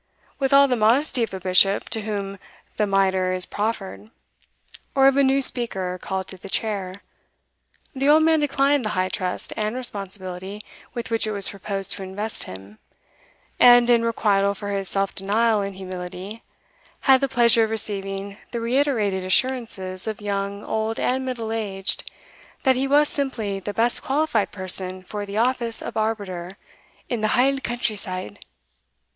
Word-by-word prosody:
With 270 Hz, -1 st, 0 dB
all 280 Hz, 0 st, +7 dB
the 255 Hz, -, +1 dB
modesty 240 Hz, +5 st, +2 dB
of 230 Hz, -, -1 dB
a 190 Hz, -, -5 dB
Bishop 185 Hz, +2 st, +3 dB
to 225 Hz, -1 st, -2 dB
whom 200 Hz, -2 st, -4 dB, 0.4 s
the 210 Hz, -, +1 dB
mitre 190 Hz, -2 st, +2 dB
is 185 Hz, -1 st, -2 dB
proffered, 210 Hz, -1 st, -4 dB, 0.9 s
or 270 Hz, -1 st, +5 dB
of 270 Hz, -, +4 dB
a 280 Hz, -, +4 dB
new 270 Hz, 0 st, +3 dB
Speaker 190 Hz, -8 st, 0 dB
called 190 Hz, -1 st, -3 dB
to 190 Hz, -, -7 dB
the 195 Hz, -, -9 dB
chair, 200 Hz, -3 st, -1 dB, 0.9 s
the 275 Hz, +1 st, +1 dB
old 310 Hz, +1 st, +6 dB
man 320 Hz, 0 st, +4 dB
declined 280 Hz, -1 st, +2 dB
the 215 Hz, -, -1 dB
high 185 Hz, 0 st, +1 dB
trust 180 Hz, -1 st, -4 dB
and 215 Hz, +2 st, -2 dB
responsibility 195 Hz, -4 st, -4 dB, 0.3 s
with 235 Hz, -1 st, -5 dB
which 225 Hz, -1 st, +3 dB
it -, -, -1 dB
was 200 Hz, -2 st, +3 dB
proposed 195 Hz, -1 st, -4 dB
to 200 Hz, -, -4 dB
invest 205 Hz, +3 st, -3 dB
him, 95 Hz, +3 st, -11 dB, 0.8 s
and, 245 Hz, 0 st, +7 dB
in 235 Hz, -1 st, +4 dB
requital 200 Hz, -3 st, +1 dB
for 205 Hz, +1 st, -6 dB
his 195 Hz, -1 st, -1 dB
self 195 Hz, 0 st, -1 dB
denial 215 Hz, +2 st, +1 dB
and 200 Hz, -1 st, -4 dB
humility, 185 Hz, +3 st, -7 dB, 0.6 s
had 265 Hz, -1 st, +5 dB
the 275 Hz, -, 0 dB
pleasure 235 Hz, -2 st, +5 dB
of -, -, -6 dB
receiving 200 Hz, -2 st, -2 dB
the 235 Hz, -, -4 dB
reiterated 230 Hz, -6 st, 0 dB
assurances 190 Hz, -3 st, -1 dB
of 215 Hz, -2 st, -3 dB
young, 200 Hz, -1 st, -3 dB
old, 220 Hz, +1 st, -2 dB
and 260 Hz, +1 st, 0 dB
middle 240 Hz, -4 st, -4 dB
aged, 200 Hz, -3 st, -1 dB, 0.5 s
that 265 Hz, -2 st, +4 dB
he 265 Hz, +2 st, 0 dB
was 295 Hz, +2 st, +4 dB
simply 230 Hz, -10 st, -2 dB
the 200 Hz, +2 st, -5 dB
best 230 Hz, +4 st, +1 dB
qualified 270 Hz, -6 st, 0 dB
person 185 Hz, -1 st, +1 dB
for 205 Hz, +2 st, -6 dB
the 200 Hz, +1 st, -5 dB
office 235 Hz, -1 st, +1 dB
of -, -, -6 dB
arbiter 200 Hz, -4 st, -3 dB, 0.5 s
"in 235 Hz, -3 st, -3 dB
the 215 Hz, -, +2 dB
haill 270 Hz, +2 st, +3 dB
country 240 Hz, -4 st, -2 dB
side." 185 Hz, -, -5 dB
210 Hz, 165 wpm, -23 LUFS, 195-240 Hz, 0.9 s, all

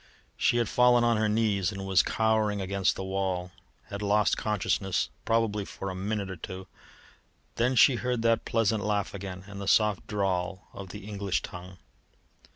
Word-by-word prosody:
She 120 Hz, -, +2 dB
had 120 Hz, -2 st, +1 dB
fallen 125 Hz, +1 st, +4 dB
on 120 Hz, -1 st, +3 dB
her 110 Hz, 0 st, +1 dB
knees 105 Hz, -3 st, +1 dB
and 95 Hz, -1 st, -6 dB
was 95 Hz, -1 st, +4 dB
cowering 110 Hz, -2 st, +1 dB
against 95 Hz, 0 st, 0 dB
the -, -, -5 dB
wall, 95 Hz, -2 st, -2 dB, 0.4 s
had 100 Hz, -, -5 dB
lost 105 Hz, 0 st, +2 dB
consciousness 100 Hz, -2 st, -1 dB, 0.2 s
probably 115 Hz, -2 st, +1 dB
for 95 Hz, 0 st, -6 dB
a -, -, -6 dB
minute 100 Hz, +1 st, -2 dB
or 95 Hz, -1 st, -7 dB
two. 95 Hz, +3 st, -7 dB, 0.9 s
Then 125 Hz, +3 st, +2 dB
she 125 Hz, +1 st, +6 dB
heard 125 Hz, -1 st, -1 dB
that 115 Hz, -1 st, +2 dB
pleasant 110 Hz, -2 st, +1 dB
laugh 105 Hz, -1 st, -1 dB
again 95 Hz, -2 st, -7 dB
and 100 Hz, 0 st, -9 dB
the 100 Hz, -, -5 dB
soft 105 Hz, -2 st, +2 dB
drawl 95 Hz, -2 st, -2 dB
of 100 Hz, -1 st, -8 dB
the 105 Hz, +1 st, -9 dB
English 100 Hz, -3 st, -2 dB
tongue. 90 Hz, +1 st, -9 dB
100 Hz, 170 wpm, -28 LUFS, 95-110 Hz, 0.9 s, she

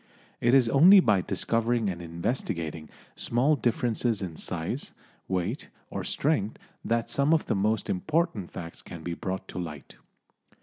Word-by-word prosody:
It 120 Hz, +2 st, +4 dB
is 130 Hz, -3 st, +5 dB
only 170 Hz, -, +8 dB
by 105 Hz, -, +3 dB
discovering 115 Hz, +4 st, 0 dB
and 90 Hz, -3 st, -3 dB
investigating 85 Hz, -, -3 dB, 0.3 s
small 130 Hz, +6 st, +2 dB
differences 120 Hz, -3 st, 0 dB
in 85 Hz, -4 st, -5 dB
size, 90 Hz, -, -4 dB, 0.3 s
weight 95 Hz, -, -2 dB, 0.2 s
or -, -, -3 dB
strength 115 Hz, -8 st, 0 dB, 0.3 s
that 115 Hz, 0 st, 0 dB
some 140 Hz, +3 st, +3 dB
of 160 Hz, -, -1 dB
the -, -, 0 dB
most 105 Hz, +2 st, 0 dB
important 150 Hz, -, 0 dB
facts 85 Hz, 0 st, -8 dB
can 85 Hz, -2 st, -10 dB
be 85 Hz, -, -3 dB
brought 95 Hz, 0 st, -4 dB
to -, -, -5 dB
light. 75 Hz, -6 st, -7 dB
110 Hz, 145 wpm, -27 LUFS, 90-125 Hz, 0.3 s, only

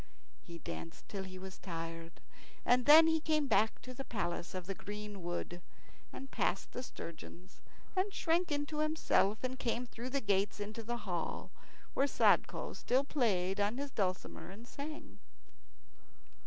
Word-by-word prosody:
He 170 Hz, -1 st, -9 dB
danced 80 Hz, -, -7 dB
till 195 Hz, -2 st, -4 dB
he 185 Hz, 0 st, -8 dB
was 190 Hz, 0 st, -8 dB
tired, 165 Hz, -1 st, -6 dB, 0.4 s
and 250 Hz, +1 st, +4 dB
then 315 Hz, +2 st, +11 dB
he 320 Hz, 0 st, +4 dB
came 310 Hz, -1 st, +2 dB
back 220 Hz, -4 st, +3 dB
to 255 Hz, -, -7 dB
the 270 Hz, -, -5 dB
palace 185 Hz, -7 st, -3 dB
of 185 Hz, -1 st, -4 dB
green 210 Hz, 0 st, -6 dB
wood, 175 Hz, 0 st, -3 dB, 0.5 s
and 270 Hz, 0 st, -8 dB
passed -, -, 0 dB
the 250 Hz, -, -4 dB
sturgeons, 180 Hz, -4 st, -9 dB, 0.3 s
and 380 Hz, +2 st, +2 dB
shrank 340 Hz, -1 st, +1 dB
into 290 Hz, +1 st, -1 dB
himself 305 Hz, -9 st, +2 dB
and 255 Hz, 0 st, -2 dB
came 240 Hz, +1 st, 0 dB
through 240 Hz, +1 st, -6 dB
the 275 Hz, +1 st, +1 dB
gates 200 Hz, -3 st, +1 dB
into 210 Hz, +2 st, -4 dB
the 240 Hz, +2 st, -2 dB
hall, 175 Hz, -4 st, -3 dB, 0.4 s
where 275 Hz, -, +3 dB
Sadko -, -, +3 dB
still 260 Hz, +3 st, +2 dB
played 200 Hz, -10 st, +1 dB
on 205 Hz, +4 st, +2 dB
his 280 Hz, 0 st, -3 dB
dulcimer 185 Hz, -4 st, -2 dB
and 215 Hz, +5 st, -10 dB
sang. 300 Hz, +4 st, -7 dB
220 Hz, 155 wpm, -35 LUFS, 185-275 Hz, 0.5 s, then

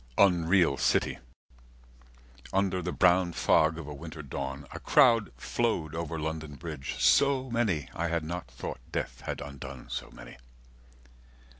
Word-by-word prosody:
Unreal 90 Hz, -5 st, +4 dB
City, -, -, +1 dB, 1.2 s
60 60 Hz, -, -17 dB
Under 95 Hz, -2 st, +1 dB
the 90 Hz, +1 st, -3 dB
brown 90 Hz, -1 st, +3 dB
fog 80 Hz, 0 st, +3 dB
of 80 Hz, -, -6 dB
a 75 Hz, -, -7 dB
winter 80 Hz, +1 st, -8 dB
dawn, 65 Hz, +1 st, -5 dB
A -, -, -7 dB
crowd 115 Hz, -, +4 dB
flowed 85 Hz, -, -1 dB
over 80 Hz, -1 st, -3 dB
London 80 Hz, -1 st, -4 dB
Bridge, 75 Hz, -3 st, -6 dB
so 135 Hz, -2 st, +4 dB
many, 105 Hz, -, 0 dB
I 85 Hz, -, -1 dB
had 85 Hz, -1 st, -1 dB
not 85 Hz, -2 st, -5 dB
thought 60 Hz, +1 st, -6 dB
death -, -, -4 dB
had -, -, -3 dB
undone 70 Hz, -2 st, -8 dB
so -, -, -4 dB
many. -, -, -12 dB
80 Hz, 145 wpm, -29 LUFS, 75-95 Hz, 1.2 s, Unreal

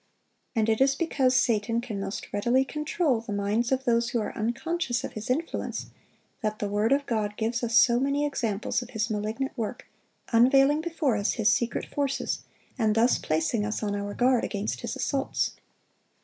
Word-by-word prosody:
And 220 Hz, -1 st, +2 dB
it 225 Hz, +2 st, +1 dB
is 275 Hz, 0 st, +4 dB
because 270 Hz, -5 st, +1 dB
Satan 230 Hz, -1 st, +2 dB
can 230 Hz, -4 st, -5 dB
most 195 Hz, +1 st, -5 dB
readily 240 Hz, +6 st, +2 dB
control 300 Hz, -4 st, 0 dB
the 225 Hz, -, -8 dB
minds 205 Hz, +4 st, 0 dB
of 265 Hz, 0 st, +1 dB
those 235 Hz, -1 st, +2 dB
who 240 Hz, -, 0 dB
are 215 Hz, -, -4 dB
unconscious 250 Hz, +3 st, -1 dB
of -, -, -5 dB
his 215 Hz, +2 st, -6 dB
influence, 310 Hz, +7 st, -2 dB, 0.5 s
that 215 Hz, -1 st, -1 dB
the 205 Hz, -, -2 dB
word 210 Hz, +3 st, +1 dB
of 280 Hz, +1 st, +3 dB
God 210 Hz, -4 st, -2 dB
gives 235 Hz, +2 st, -1 dB
us 230 Hz, 0 st, +2 dB
so 240 Hz, 0 st, +6 dB
many 280 Hz, +2 st, +1 dB
examples 230 Hz, -5 st, -1 dB
of 245 Hz, -, -9 dB
his 220 Hz, -1 st, -2 dB
malignant 215 Hz, +6 st, -2 dB
work, 235 Hz, 0 st, -4 dB, 0.5 s
unveiling 270 Hz, +5 st, +5 dB
before 320 Hz, -7 st, 0 dB
us 205 Hz, +1 st, +1 dB
his 220 Hz, -2 st, +2 dB
secret 235 Hz, +1 st, -1 dB
forces, 280 Hz, -1 st, -2 dB, 0.4 s
and 215 Hz, -2 st, +2 dB
thus 235 Hz, +2 st, +3 dB
placing 160 Hz, +8 st, 0 dB
us 215 Hz, +1 st, -3 dB
on 205 Hz, -1 st, -1 dB
our 205 Hz, 0 st, -4 dB
guard 250 Hz, -1 st, +3 dB
against 205 Hz, +1 st, -3 dB
his -, -, -4 dB
assaults. 275 Hz, -1 st, -1 dB
235 Hz, 180 wpm, -27 LUFS, 215-270 Hz, 0.5 s, so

